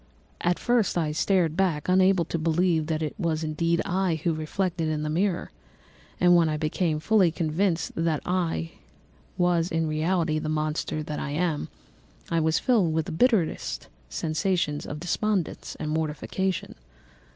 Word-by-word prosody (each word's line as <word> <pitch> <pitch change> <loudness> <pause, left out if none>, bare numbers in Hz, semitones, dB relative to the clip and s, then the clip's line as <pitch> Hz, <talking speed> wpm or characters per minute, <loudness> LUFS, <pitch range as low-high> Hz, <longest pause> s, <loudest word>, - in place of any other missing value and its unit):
At 175 0 +2
first 240 -7 +1
I 160 -3 +1
started 165 +1 +1
back, 175 -6 0
unable 185 -1 +4
to 165 - -3
believe 165 0 +1
that 160 -1 -1
it 155 - -2
was 165 -3 0
indeed 165 +2 0
I 180 -3 0
who 170 - +2
was 155 - -3
reflected 170 +1 -1
in 155 -1 -1
the 150 - -2
mirror; 180 +2 0 0.7
and 175 0 +6
when 165 -2 +4
I 155 - -1
became 155 +1 0
fully 195 +1 +4
convinced 165 +2 0
that 165 -2 0
I 170 - -1 0.7
was 175 -1 +2
in 165 0 0
reality 155 0 0
the 155 - -3
monster 155 0 -1
that 150 0 -4
I - - -3
am, 155 0 -1 0.6
I 165 - +2
was 160 0 +2
filled 205 -11 +2
with 160 -1 0
the - - -6
bitterest 205 -2 +1 0.2
sensations 155 - -1
of 150 - -5
despondence 185 +2 -1
and 155 0 -3
mortification. 160 +4 -2
165 Hz, 160 wpm, -26 LUFS, 155-180 Hz, 0.7 s, and